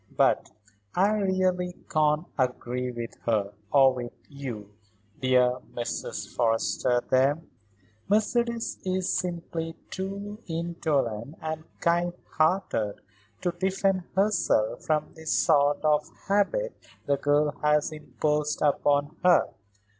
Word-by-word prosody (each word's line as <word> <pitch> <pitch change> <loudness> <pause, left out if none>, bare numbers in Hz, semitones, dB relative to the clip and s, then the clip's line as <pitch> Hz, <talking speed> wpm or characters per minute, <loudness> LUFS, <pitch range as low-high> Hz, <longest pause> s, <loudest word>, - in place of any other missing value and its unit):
But - - +3 0.5
I 195 +3 +4
really 185 -3 +1
can't 155 -2 +2
agree 125 -1 -1
with 120 -1 -6
her, 105 -3 +1 0.2
or 135 -2 +6
with 120 -1 -5 0.2
you, 125 -8 -7 0.5
dear 125 -1 +3 0.2
Mrs. 120 -1 -4
Forrester, 120 +1 +1
there. 135 +3 +4 0.7
Mercedes 235 +2 +1
is 185 -1 0
simply 170 -2 -3 0.2
too 200 +2 -5
indolent 155 -7 -1
and 160 0 -4 0.2
kind 175 +1 +2 0.2
hearted 155 - +1 0.5
to 175 - +1
defend 190 +1 +1
herself 190 - +2
from 155 -1 0
the 160 0 -12
sort 145 0 +3
of 150 0 +3 0.2
habit 340 - +1 0.3
the 140 0 +2
girl 145 +1 +2
has 150 +1 +3
imposed 150 0 -1
upon 145 +1 +2
her. 180 -1 +5
155 Hz, 110 wpm, -27 LUFS, 130-185 Hz, 0.7 s, or